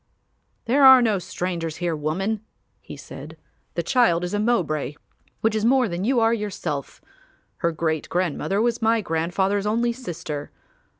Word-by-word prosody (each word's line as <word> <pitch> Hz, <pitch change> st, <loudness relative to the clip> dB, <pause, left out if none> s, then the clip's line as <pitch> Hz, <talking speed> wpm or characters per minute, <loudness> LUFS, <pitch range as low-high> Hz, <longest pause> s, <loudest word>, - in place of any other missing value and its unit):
"There 270 Hz, +4 st, +3 dB
are 265 Hz, -1 st, +10 dB
no 220 Hz, -5 st, +2 dB
strangers 170 Hz, -3 st, -4 dB
here, 175 Hz, -2 st, -2 dB
woman," 190 Hz, +8 st, -2 dB, 0.4 s
he -, -, -11 dB
said. -, -, -10 dB, 0.4 s
"The -, -, -1 dB
child 230 Hz, -10 st, +3 dB
is 180 Hz, -, -3 dB
a 205 Hz, -, 0 dB
Mowbray 155 Hz, -, 0 dB, 0.5 s
which 220 Hz, 0 st, +2 dB
is 215 Hz, -1 st, -1 dB
more 255 Hz, +1 st, +4 dB
than 175 Hz, -1 st, -3 dB
you 255 Hz, +1 st, +2 dB
are 225 Hz, 0 st, +3 dB
yourself; 185 Hz, -10 st, -4 dB, 0.6 s
her 170 Hz, -2 st, 0 dB
great 160 Hz, -1 st, -2 dB
grandmother 180 Hz, +2 st, -1 dB
was 235 Hz, -1 st, 0 dB
my 225 Hz, 0 st, +3 dB
grandfather's 190 Hz, +4 st, 0 dB
only 235 Hz, +2 st, +1 dB
sister. 165 Hz, -, -6 dB
195 Hz, 155 wpm, -23 LUFS, 165-230 Hz, 0.6 s, are